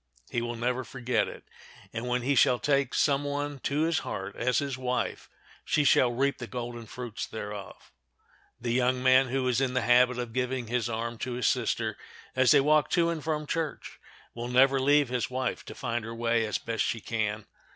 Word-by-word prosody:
He 120 Hz, -, 0 dB
will 120 Hz, 0 st, -3 dB
never 125 Hz, +2 st, -1 dB
forget 125 Hz, -1 st, -1 dB
it, -, -, -9 dB, 0.5 s
and 115 Hz, +2 st, -4 dB
when 125 Hz, 0 st, 0 dB
he 140 Hz, +3 st, +2 dB
shall 125 Hz, -2 st, +4 dB
take 140 Hz, -1 st, +1 dB
some 140 Hz, -1 st, +2 dB
one 145 Hz, 0 st, -3 dB
to 145 Hz, +3 st, -1 dB
his 165 Hz, 0 st, +1 dB
heart 95 Hz, -, -5 dB
as 125 Hz, +1 st, +1 dB
his 140 Hz, -2 st, -1 dB
wife 125 Hz, -1 st, -2 dB, 0.3 s
she 150 Hz, -, +2 dB
shall 130 Hz, -3 st, +4 dB
reap 135 Hz, +3 st, 0 dB
the 120 Hz, -, -6 dB
golden 120 Hz, -2 st, -6 dB
fruits 120 Hz, -1 st, -6 dB
thereof. 105 Hz, -2 st, -8 dB, 0.7 s
The 120 Hz, 0 st, -2 dB
young 125 Hz, 0 st, +1 dB
man 130 Hz, +1 st, +5 dB
who 130 Hz, 0 st, -1 dB
is 125 Hz, 0 st, +1 dB
in 130 Hz, -1 st, 0 dB
the 125 Hz, -, +2 dB
habit 125 Hz, 0 st, +4 dB
of 120 Hz, -2 st, -4 dB
giving 130 Hz, 0 st, -1 dB
his 120 Hz, +1 st, -1 dB
arm 115 Hz, 0 st, -3 dB
to 125 Hz, -, -3 dB
his 120 Hz, -1 st, -2 dB
sister -, -, 0 dB, 0.4 s
as 130 Hz, -1 st, +4 dB
they -, -, +7 dB
walk 150 Hz, +1 st, +3 dB
to 170 Hz, -1 st, +4 dB
and 160 Hz, -3 st, -4 dB
from 155 Hz, -1 st, -1 dB
church 160 Hz, 0 st, -4 dB, 0.3 s
will 120 Hz, 0 st, -5 dB
never 135 Hz, +2 st, +4 dB
leave 145 Hz, 0 st, +4 dB
his 125 Hz, -1 st, -1 dB
wife 130 Hz, 0 st, -2 dB
to -, -, -9 dB
find 120 Hz, -2 st, -3 dB
her 115 Hz, +1 st, -6 dB
way 115 Hz, -1 st, +1 dB
as 105 Hz, -, -1 dB
best 115 Hz, -1 st, -2 dB
she 115 Hz, -, -1 dB
can. 110 Hz, -1 st, -2 dB
125 Hz, 205 wpm, -28 LUFS, 120-135 Hz, 0.7 s, they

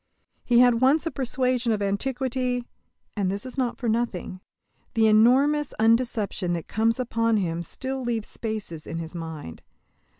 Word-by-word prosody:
He 240 Hz, -1 st, +5 dB
had 245 Hz, -1 st, +4 dB
once 285 Hz, +5 st, +4 dB
a 330 Hz, -, -1 dB
persuasion 255 Hz, -2 st, 0 dB
of 215 Hz, -, +1 dB
Antiquity. 250 Hz, +4 st, -1 dB, 0.5 s
And 200 Hz, -3 st, 0 dB
this 200 Hz, +4 st, -3 dB
is 255 Hz, -, -7 dB
not 255 Hz, -3 st, -1 dB
for 240 Hz, -, -4 dB
nothing. 220 Hz, -5 st, -2 dB, 0.6 s
The 225 Hz, -1 st, +4 dB
enormous 260 Hz, +7 st, +4 dB
undeception 220 Hz, -5 st, +1 dB
that 170 Hz, -, -6 dB
comes 225 Hz, +2 st, +1 dB
upon 230 Hz, -2 st, +1 dB
him 170 Hz, -4 st, -1 dB
still 265 Hz, +9 st, -5 dB
leaves 235 Hz, -3 st, -2 dB
spaces 215 Hz, -8 st, -6 dB
in 165 Hz, -, -4 dB
his 165 Hz, 0 st, -6 dB
mind. 160 Hz, -, -7 dB
230 Hz, 155 wpm, -25 LUFS, 200-255 Hz, 0.6 s, He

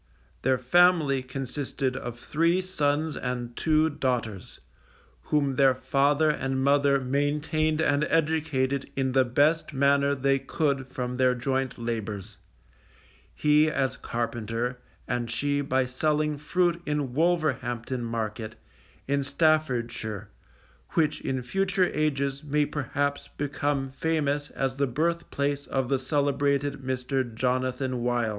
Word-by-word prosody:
Their 130 Hz, -1 st, +2 dB
family 150 Hz, 0 st, +4 dB
consisted 130 Hz, 0 st, -3 dB
of 120 Hz, -2 st, -5 dB
three 165 Hz, +8 st, +1 dB
sons 155 Hz, -4 st, 0 dB
and 120 Hz, -1 st, -4 dB
two 155 Hz, 0 st, +3 dB
daughters, 125 Hz, -9 st, -3 dB, 0.7 s
whom 140 Hz, -3 st, +1 dB
their 135 Hz, -2 st, +5 dB
father 145 Hz, +4 st, +2 dB
and 135 Hz, -2 st, -2 dB
mother 140 Hz, 0 st, +4 dB
maintained 150 Hz, +4 st, 0 dB
and 145 Hz, 0 st, +2 dB
educated 150 Hz, -4 st, 0 dB
in 130 Hz, -1 st, 0 dB
the 130 Hz, 0 st, +4 dB
best 145 Hz, +6 st, +2 dB
manner 140 Hz, +1 st, +3 dB
they 135 Hz, 0 st, +2 dB
could 140 Hz, -3 st, -1 dB
from 125 Hz, -1 st, -4 dB
their 130 Hz, -1 st, +3 dB
joint 130 Hz, +1 st, -1 dB
labours, 110 Hz, -3 st, -4 dB, 1.0 s
he 150 Hz, +1 st, +4 dB
as 135 Hz, -3 st, 0 dB
carpenter, 120 Hz, +1 st, -3 dB, 0.3 s
and 120 Hz, -1 st, -2 dB
she 145 Hz, +4 st, 0 dB
by 130 Hz, -2 st, +1 dB
selling 150 Hz, +4 st, 0 dB
fruit 170 Hz, +3 st, 0 dB
in 145 Hz, -4 st, -1 dB
Wolverhampton 130 Hz, -7 st, 0 dB
market, 110 Hz, -1 st, -4 dB, 0.5 s
in 140 Hz, 0 st, +1 dB
Staffordshire, 120 Hz, -, 0 dB, 0.6 s
which 155 Hz, -3 st, +1 dB
in 130 Hz, -1 st, -2 dB
future 195 Hz, -, +1 dB
ages 140 Hz, -2 st, 0 dB
may 150 Hz, 0 st, +1 dB
perhaps 145 Hz, 0 st, -2 dB
become 145 Hz, -1 st, -1 dB
famous 145 Hz, 0 st, -1 dB
as 135 Hz, -1 st, -2 dB
the 140 Hz, 0 st, +1 dB
birth 165 Hz, +7 st, -1 dB
place 140 Hz, 0 st, -1 dB
of 130 Hz, -2 st, -1 dB
the 135 Hz, -, +2 dB
celebrated 140 Hz, 0 st, 0 dB
Mr. 130 Hz, +1 st, -1 dB
Jonathan 130 Hz, +1 st, -1 dB
Wild. 120 Hz, -2 st, +1 dB
140 Hz, 125 wpm, -27 LUFS, 125-150 Hz, 1.0 s, their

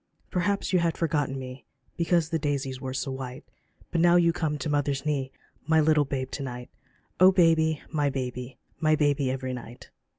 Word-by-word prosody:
Perhaps 195 Hz, +2 st, 0 dB
you 180 Hz, -, +5 dB
had 170 Hz, -1 st, 0 dB
forgotten 145 Hz, -5 st, 0 dB
me 130 Hz, 0 st, -8 dB, 0.3 s
Because 170 Hz, -1 st, +1 dB
the 165 Hz, -, 0 dB
daisies 140 Hz, -3 st, -2 dB
were 130 Hz, -, -4 dB
so 135 Hz, +1 st, -3 dB
white, 130 Hz, +1 st, -6 dB, 0.5 s
But 170 Hz, -, +1 dB
now 175 Hz, 0 st, +5 dB
you 170 Hz, -1 st, +4 dB
come 155 Hz, -3 st, -1 dB
to 140 Hz, -, -4 dB
mother's 145 Hz, -1 st, 0 dB
knee, 140 Hz, -3 st, -1 dB, 0.4 s
My 160 Hz, 0 st, +4 dB
little 155 Hz, -1 st, +4 dB
babe 130 Hz, -1 st, -3 dB
to -, -, -5 dB
night 125 Hz, -2 st, -6 dB
j -, -, -38 dB, 0.4 s
Oh 185 Hz, +1 st, +8 dB
baby, 160 Hz, -4 st, +3 dB
my 145 Hz, -3 st, +1 dB
baby 125 Hz, -1 st, -5 dB
I -, -, -42 dB
My 155 Hz, -1 st, +3 dB
baby 145 Hz, -3 st, +1 dB
every 130 Hz, 0 st, -3 dB
night. 120 Hz, -1 st, -10 dB
145 Hz, 195 wpm, -27 LUFS, 130-160 Hz, 0.5 s, Oh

